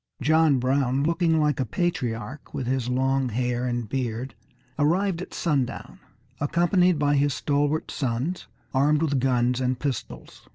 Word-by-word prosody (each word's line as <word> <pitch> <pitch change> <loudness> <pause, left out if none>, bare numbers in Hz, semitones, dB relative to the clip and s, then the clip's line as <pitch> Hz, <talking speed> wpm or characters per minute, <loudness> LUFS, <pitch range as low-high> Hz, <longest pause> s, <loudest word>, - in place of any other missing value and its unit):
John 155 +1 +4
Brown, 130 +1 +1
looking 165 0 +2
like 150 -2 +1
a - - +2
patriarch 135 -2 -3
with 130 - -3
his 125 -1 -1
long 130 +1 +1
hair 125 +1 -1
and 120 -2 -2
beard, 125 0 -3 0.5
arrived 175 +4 +1
at - - -8
sundown, 140 -7 -2 0.4
accompanied 175 +3 +2
by 145 0 +2
his 145 -1 +2
stalwart 145 +1 0
sons 135 +7 -2 0.3
armed 145 +3 +3
with 145 -4 +1
guns 125 -1 +1
and 130 0 0
pistols. 140 -5 -6
140 Hz, 140 wpm, -25 LUFS, 125-155 Hz, 0.5 s, John